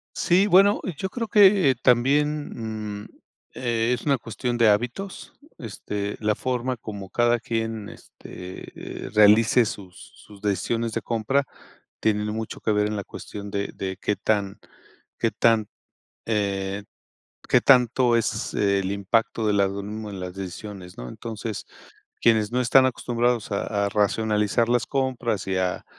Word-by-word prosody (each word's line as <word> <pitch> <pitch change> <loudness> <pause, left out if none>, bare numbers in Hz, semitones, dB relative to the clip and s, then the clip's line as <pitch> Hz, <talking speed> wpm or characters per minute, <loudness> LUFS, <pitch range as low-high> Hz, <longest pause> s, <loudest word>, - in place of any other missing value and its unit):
Sí, 185 +4 +3
bueno, 200 +3 +5 0.2
yo 190 - -3
creo 230 +2 -4
que 195 - +6
también, 120 -5 0
mm, - - -14 0.5
eh, 120 -1 0
es 125 - -2
una 140 -2 +3
cuestión 120 +1 -3
de 115 - +5
hábitos. 120 - -1 0.3
Esta, 110 -3 -8 0.2
la 105 -1 +1
forma 125 +1 -2
como 100 -4 -8
cada 120 0 +2
quien 115 -2 -3
este, 90 +1 -10
eh, - - -8
realice 110 +3 +6
sus 95 -4 -9
sus 105 -1 -16
decisiones 115 +3 -1
de - - -2
compra, 120 +5 0 0.6
tienen 105 -1 +1
mucho 110 +1 -5
que 110 - 0
ver 105 0 +2
en 105 - -3
la 100 - -4
cuestión 100 +2 -8
de 100 0 -2
de 95 0 -5
qué 105 - 0
tan 100 -2 -1 0.6
qué - - 0
tan, 115 -2 +2 0.6
eh, 100 -2 -1 0.6
qué - - +5
tanto 125 -1 +4
es 115 - -1
el 100 -1 +1
impacto 110 +3 0
de 105 - +3
la 100 -1 +4
algoritmo 100 +2 -4
en 95 - -7
las 90 0 -6
decisiones 95 -1 -8
¿no? - - -6
Entonces 110 - -6 0.6
quienes 110 -2 +3
no 125 - 0
están 130 +2 +5
acostumbrados 120 -3 0
a 100 0 -1
a - - -1
racionalizar 105 +2 +1
las 120 0 +2
compras 125 -7 -1
y 95 - -1
a, 95 -1 -1
110 Hz, 150 wpm, -24 LUFS, 100-120 Hz, 0.6 s, que